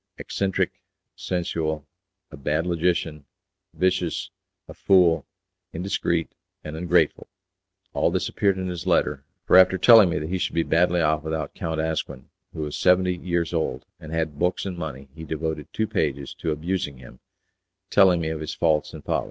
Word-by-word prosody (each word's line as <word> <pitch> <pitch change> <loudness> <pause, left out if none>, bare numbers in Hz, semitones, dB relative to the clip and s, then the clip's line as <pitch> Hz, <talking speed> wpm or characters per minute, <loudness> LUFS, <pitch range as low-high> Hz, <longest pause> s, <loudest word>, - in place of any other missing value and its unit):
Eccentric, 95 -1 -1 0.4
sensual, 80 -4 -2 0.5
a - - -8
bad 75 +3 -1
logician, 85 -3 -1 0.5
vicious, 90 -2 0 0.4
a - - -10
fool, 85 -5 +3 0.5
indiscreet, 85 -2 -1 0.3
and 75 0 -7
ungrateful, 85 +1 +1 0.7
all - - +2
this - - -1
appeared 100 -2 +1
in 95 - -3
his 90 -2 -5
letter, - - +1 0.2
for - - +6
after 95 0 +6
telling 110 0 +7
me 85 - -1
that 75 +1 -4
he 95 +1 -1
should - - -2
be 85 - +2
badly 85 +1 +2
off 75 -1 +2
without 80 -1 -4
Count 80 -1 -3
Asquin 80 -5 -3 0.2
who - - -6
was 75 -1 -4
seventy 90 0 +3
years 85 -1 -2
old, 80 -2 -2
and 75 - -10
had 80 -3 -2
books 90 +2 0
and 95 -2 -4
money, 70 -5 -6
he 80 0 -10
devoted 80 -1 -4
two 110 - -1
pages 70 -8 -2
to 80 - -4
abusing 80 -2 -2
him, 60 -1 -14 0.7
telling 95 -3 +5
me 80 -1 -2
of 80 -1 -4
his 80 - -5
faults 80 -3 +1
and - - -10
follies. - - +1
80 Hz, 170 wpm, -24 LUFS, 75-90 Hz, 0.7 s, telling